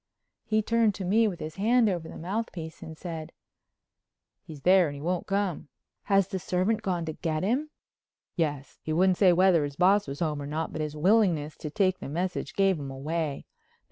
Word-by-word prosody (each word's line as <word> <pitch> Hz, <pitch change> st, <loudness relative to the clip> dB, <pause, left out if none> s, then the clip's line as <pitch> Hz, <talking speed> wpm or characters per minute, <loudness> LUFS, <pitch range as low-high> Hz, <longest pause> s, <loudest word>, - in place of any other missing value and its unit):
He 215 Hz, -1 st, +1 dB
turned 230 Hz, -2 st, +2 dB
to 190 Hz, -, -5 dB
me 220 Hz, +5 st, +3 dB
with 180 Hz, -5 st, -4 dB
his 155 Hz, +2 st, -7 dB
hand 230 Hz, +3 st, +3 dB
over 175 Hz, -5 st, -2 dB
the -, -, -9 dB
mouthpiece 175 Hz, -3 st, -5 dB
and 160 Hz, 0 st, -9 dB
said: 160 Hz, -3 st, -6 dB, 1.1 s
"He's 155 Hz, -3 st, -11 dB
there 185 Hz, +2 st, +5 dB
and 145 Hz, -, -5 dB
he -, -, -8 dB
won't 175 Hz, +2 st, -2 dB
come." 195 Hz, -6 st, -1 dB, 0.4 s
"Has 195 Hz, -2 st, +3 dB
the 190 Hz, -1 st, -4 dB
servant 190 Hz, +4 st, 0 dB
gone 180 Hz, -5 st, -1 dB
to 160 Hz, -, -4 dB
get 155 Hz, 0 st, -2 dB
him?" 260 Hz, +10 st, 0 dB, 0.7 s
"Yes. 145 Hz, -5 st, -2 dB
He 155 Hz, -, -3 dB
wouldn't 185 Hz, +2 st, +3 dB
say 190 Hz, -3 st, +6 dB
whether 175 Hz, -2 st, +4 dB
his 145 Hz, -1 st, -4 dB
boss 190 Hz, +4 st, +3 dB
was 140 Hz, +1 st, -6 dB
home 150 Hz, -3 st, -1 dB
or 140 Hz, -, -5 dB
not, 155 Hz, +2 st, -3 dB
but 155 Hz, -, -4 dB
his 150 Hz, 0 st, -4 dB
willingness 170 Hz, -4 st, +2 dB
to 155 Hz, -, -6 dB
take 185 Hz, +2 st, +1 dB
the -, -, -7 dB
message 180 Hz, +5 st, -3 dB
gave 195 Hz, -4 st, +3 dB
him 140 Hz, -1 st, -6 dB
away. 145 Hz, +2 st, -3 dB
180 Hz, 200 wpm, -28 LUFS, 155-195 Hz, 1.1 s, say